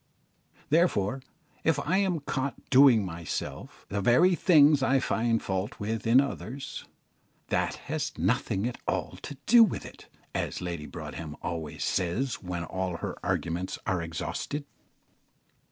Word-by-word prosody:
Therefore, 135 - +2 0.4
if 160 -3 +2
I 165 +6 +1
am 185 -5 +1
caught 135 -1 -2 0.2
doing 130 -6 +7
myself 85 -2 -6
the 100 0 -1
very 165 - +5
things 150 -5 +5
I 130 +1 +3
find 115 -2 +1
fault 95 0 -3
with 110 +2 -3
in 120 +3 +7
others, 140 0 -4 0.6
"that - - 0
has - - -2
nothing 100 +4 0
at 125 - -5
all - - -2
to 145 - -7
do 235 +1 +8
with 215 - -1
it," - - -12 0.3
as - - -2
Lady 85 -4 -4
Broadhem 80 -3 -7
always 80 -3 -4
says 110 +9 -1
when 90 -2 -4
all 95 0 -3
her - - -4
arguments 85 +3 -2
are 95 -2 0
exhausted. 85 - -4
115 Hz, 135 wpm, -28 LUFS, 90-140 Hz, 0.6 s, do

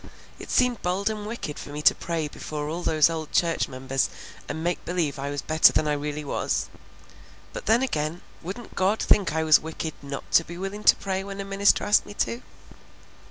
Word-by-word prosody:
It - - -9
seemed 250 -2 +2
bold 190 +4 0
and 210 -1 -5
wicked 215 -10 -5
for - - -8
me 150 +1 -6
to - - +7
pray 165 -3 -3
before 150 0 -5
all 165 +3 -3
those 155 -3 +4
old 160 -2 -4
church 165 -1 +1
members 130 +1 -1 0.4
and 160 - -4
make 175 0 -1
believe 165 -6 -1
I 140 +1 -3
was 145 0 -4
better 155 0 +6
than 155 - +1
I 150 - +2
really 150 +1 -3
was; - - -1 0.8
but - - -7
then 230 +4 +4
again, 155 - -2 0.2
wouldn't 200 +7 -8
God 195 +4 +1
think 195 -4 +3
I 160 +1 0
was 155 -1 +6
wicked 160 0 -5
not 140 -1 -7
to 165 - +6
be 170 +1 -9
willing 195 +3 -5
to - - +8
pray 190 -1 -3
when 200 0 -7
a 195 - -4
minister 195 0 +3
asked 205 - +3
me 205 - -9
to?" 235 +3 -1
165 Hz, 205 wpm, -25 LUFS, 150-195 Hz, 0.8 s, to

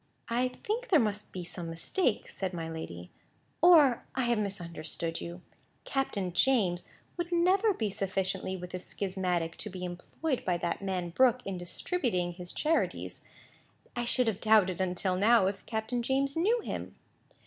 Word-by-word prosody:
"I 245 +2 +2 0.2
think 465 +4 -2
there 330 - +6
must 210 -3 -1
be 180 - -5
some 170 -1 -6
mistake," 215 - 0
said 190 -2 -4
my 165 -1 -3
lady, 90 - -7 0.5
"or 305 -8 +7
I 260 - +1
have 240 -2 +2
misunderstood 170 -4 -3
you. 175 +1 -7 0.4
Captain 205 -10 -1
James 185 -6 +2 0.3
would 345 0 -3
never 370 +5 +4
be 220 - -1
sufficiently 190 -1 -2
with 180 0 -8
a 185 - -2
schismatic 180 -4 -2
to 210 - -3
be 185 -1 -5
employed 240 - -3
by 180 -2 +1
that 170 +3 -2
man 185 -3 -2
Brooke 250 +5 +4
in 195 - -3
distributing 180 - -1
his 175 0 -7
charities. 320 +2 0 0.7
I 240 0 -1
should 250 +1 +2
have 220 -4 -1
doubted, 205 -5 +4
until 185 0 0
now, 215 +2 +5
if 195 0 -2
Captain 225 +2 -1
James 270 +3 +1
knew 435 +9 +2
him." - - -5
200 Hz, 160 wpm, -30 LUFS, 180-255 Hz, 0.7 s, or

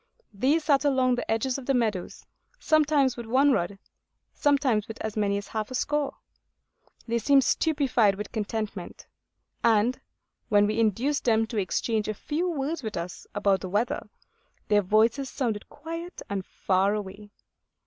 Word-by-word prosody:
These 275 +10 +2
sat 285 -3 +3
along 260 -3 +3
the 245 - -3
edges 250 +4 0
of 255 - -11
the 275 - +2
meadows, 215 -7 -2 0.3
sometimes 295 - +3
with 235 -2 -7
one 270 +5 +4
rod, 195 -4 0 0.6
sometimes 270 -7 +2
with 225 - -8
as 220 -1 -4
many 200 -2 +1
as 200 - -7
half 215 -1 -3
a 255 - -5
score. 295 +2 -1 0.9
They 235 0 0
seemed 275 +4 +4
stupefied 270 -11 +2
with 210 +2 -6
contentment; 215 -3 -4 0.6
and 230 +2 +3 0.5
when 205 -1 +5
we 215 +2 -1
induced 230 +7 +1
them 225 -2 +3
to 220 0 -6
exchange 210 +3 0
a 215 - -2
few 325 - -2
words 300 0 -2
with 220 -6 -5
us 170 +1 -6
about 200 -2 +2
the 185 - -5
weather, 210 +6 -1 0.6
their 210 -1 +5
voices 225 +7 +2
sounded 230 -7 -3
quiet 330 +4 -7
and 200 -2 -3
far 195 +2 +1
away. 205 0 -7
225 Hz, 160 wpm, -27 LUFS, 205-275 Hz, 0.9 s, when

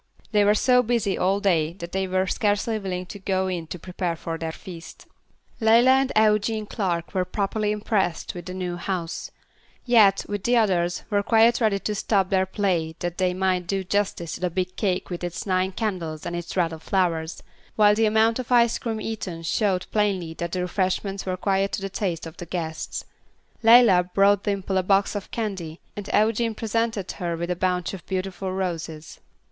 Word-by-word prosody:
They 210 -2 +4
were 205 +1 +4
so 250 +3 +4
busy 230 -5 0
all 195 +2 +1
day 170 -6 +1
that 170 -1 -8
they 190 0 -1
were 185 0 +1
scarcely 210 +3 0
willing 185 -2 -4
to 205 +3 -9
go 190 -1 0
in 175 -3 -3
to 180 - -6
prepare 180 0 -3
for 165 0 -5
their 165 0 -4
feast. 170 0 -11 0.5
Leila 230 +3 +5
and 265 0 +3
Eugene 215 0 +2
Clark 180 -6 -2
were 185 -2 +1
properly 205 +3 -1
impressed 205 -5 -1
with 175 -1 -8
the 185 - -5
new 180 -1 -3
house; 175 -2 -4 0.6
yet, 215 -6 +5
with 205 -1 -3
the 245 0 +3
others, 175 -5 +1
were 205 -1 +3
quite 230 +3 +4
ready 215 -3 +3
to 210 +2 -3
stop 195 -2 +1
their 190 -1 +2
play 180 -5 -1
that 175 0 -4
they 180 -1 +1
might 185 -2 0
do 195 +1 -1
justice 190 -4 -1
to - - -5
the 180 - 0
big 185 +1 -3
cake 190 -3 -1
with 175 0 -5
its 175 -1 -4
nine 185 -1 +1
candles, 180 -7 -3
and 175 - -3
its 175 +2 -5
wreath 170 -2 +2
of 160 - -8
flowers; 170 -4 -1 0.3
while 210 -1 +6
the 220 +1 +3
amount 220 +2 +3
of 255 -1 -6
ice 235 -1 +4
cream 225 -2 -3
eaten 195 -7 -5
showed 185 +1 0
plainly 195 -6 0
that 170 +1 -4
the 185 - -1
refreshments 190 +2 -1
were 185 0 -1
quite 195 +1 +1
to - - -2
the 195 - -3
taste 180 -4 -3
of 165 - -10
the 175 - -8
guests. 160 -2 -4 0.6
Leila 225 -6 +7
brought 200 0 +4
Dimple 195 -2 0
a - - +2
box 195 +2 +2
of 205 -2 -5
candy, 190 -8 -4 0.2
and 205 -1 -6
Eugene 225 +1 +2
presented 225 -2 -1
her 170 -3 -3
with 170 +1 -3
a - - 0
bunch 180 0 -1
of 185 -4 -8
beautiful 190 0 -3
roses. 165 -5 -4
190 Hz, 195 wpm, -24 LUFS, 175-210 Hz, 0.6 s, Leila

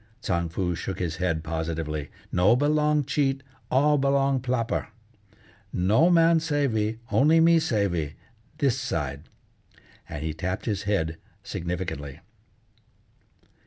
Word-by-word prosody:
Tsang 85 -6 -1
Foo 90 +1 -1
shook 95 +3 -4
his 80 -3 -3
head 85 -3 -1
positively. 80 -2 -3 0.2
"No 90 +6 +4
belong 150 +2 +2
cheat, 135 -1 0 0.3
all 145 +3 +3
belong 140 0 +2
ploper. 125 -2 -1 0.8
No 110 - +3
man 165 -1 +5
savey, 135 -9 0
only 155 +4 +5
me 165 0 +6
savey, 100 - -1 0.4
this 135 -4 +1
side," 75 - -3 0.8
and 75 - -5
he 80 -1 -2
tapped 90 +5 -3
his 105 -4 -1
head 80 -5 0 0.3
significantly. 85 -5 -4
105 Hz, 115 wpm, -26 LUFS, 85-140 Hz, 0.8 s, me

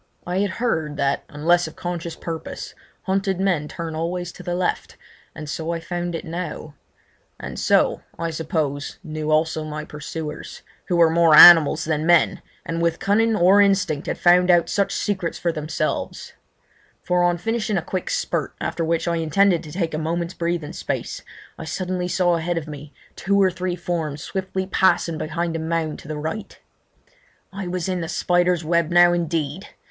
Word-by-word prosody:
I 180 +2 -1
had 205 0 +1
heard 160 - -2
that, 140 0 0
unless 170 +4 +2
of 160 - -10
conscious 175 -1 -5
purpose, 165 -2 -6 0.3
hunted 195 -1 -1
men 180 -6 0
turn 165 +1 -6
always 175 +2 -3
to - - -12
the 175 - -3
left, 180 0 -2 0.4
and 155 -1 -7
so 160 +2 -3
I 170 - -2
found 175 +1 -4
it - - -5
now; 165 -2 -6 0.7
and - - -6
so, - - +2 0.2
I 165 0 -2
suppose, 155 -3 -3
knew 155 -2 -4
also 155 0 +1
my 155 0 -5
pursuers, 150 0 -7 0.2
who 180 - 0
were 165 -1 +5
more 165 -2 +5
animals 165 -1 +9
than 155 0 -1
men, 175 -1 +4 0.2
and 165 0 -3
with 170 -1 +1
cunning 220 +3 +2
or 195 +2 +5
instinct 195 -7 +1
had - - -2
found 180 +1 +4
out 175 -1 +4
such 200 -1 0
secrets 190 -5 -2
for 170 - 0
themselves: 155 0 -3 0.7
for 180 0 +1
on 175 0 +2
finishing 215 +1 -1
a 175 - -1
quick 185 +1 -4
spurt, - - -2
after 170 - -2
which 165 +1 0
I 170 0 +1
intended 170 +3 +2
to 155 - -10
take 170 -1 -2
a 155 - -2
moment's 170 +2 -2
breathing 170 -3 -3
space, - - -4 0.4
I 160 - -6
suddenly 180 +3 -3
saw 175 -1 +2
ahead 170 +1 -2
of 160 -2 -4
me 150 -1 -9 0.2
two 200 +2 +1
or 190 -1 +4
three 180 0 -3
forms 160 -4 -3
swiftly 190 +2 -3
passing 175 -4 +2
behind 165 +1 -2
a - - -2
mound 160 -1 -2
to - - -13
the 155 0 -4
right. 160 +8 -5 0.9
I 195 -1 -5
was 180 -1 -3
in 185 -2 -1
the 165 - -4
spider's 175 -1 +1
web 170 0 +1
now 175 0 +6
indeed! 165 0 -2
170 Hz, 180 wpm, -22 LUFS, 160-180 Hz, 0.9 s, animals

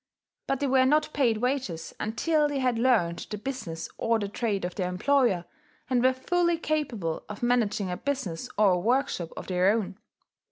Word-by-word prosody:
But 275 - 0
they - - +2
were 260 -1 +4
not 305 +2 +2
paid 240 -6 +2
wages 245 -9 -2
until 295 +8 +1
they 290 -1 -2
had 250 -3 +1
learned 220 -9 +2
the 210 - -4
business 205 -9 -5
or 230 0 +2
the 205 -2 -2
trade 205 -2 -2
of 180 - -4
their 180 -2 -2
employer, 195 -2 +2 0.5
and 245 -1 +3
were 260 - +6
fully 340 +6 +1
capable 255 - -2
of 210 +2 -7
managing 220 -6 +1
a 180 - -3
business 260 -13 -3
or 205 -2 +5
a 180 - +2
workshop 235 - 0
of - - -6
their 185 +1 +2
own. 210 -2 -1
230 Hz, 185 wpm, -27 LUFS, 190-270 Hz, 0.5 s, were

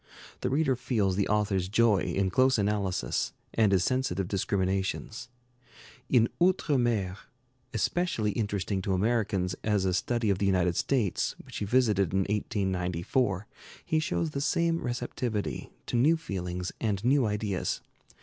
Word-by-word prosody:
The - - -1
reader 135 0 +2
feels 110 -6 0
the 100 0 +1
author's 100 -3 +1
joy 110 -1 +4
in 95 +1 0
close 130 +4 +4
analysis, 100 -2 -1 0.2
and 110 -3 +3
his 95 -3 +3
sensitive 100 -8 0
discriminations. 100 +4 -2 0.8
In 115 -3 +5
'Outre 175 -6 +3
Mer,' 105 -6 0 0.5
especially 170 -12 0
interesting 100 -3 -2
to 95 +1 -1
Americans 95 -3 +1
as 105 -3 +1
a 95 - +1
study 115 +2 +1
of 95 - 0
the 100 - +1
United 90 -2 +2
States, 110 -8 0
which - - -9
he 105 - -2
visited 105 -6 +2
in 95 - +3
1894, 95 +1 -1 0.4
he 160 - +1
shows 160 0 -1
the 140 - -3
same 170 +2 +1
receptivity 120 -3 -3 0.2
to - - -3
new 150 +8 +4
feelings 90 - -4
and 105 -2 -1
new 130 -2 +4
ideas. 105 -3 -2
105 Hz, 140 wpm, -29 LUFS, 95-120 Hz, 0.8 s, In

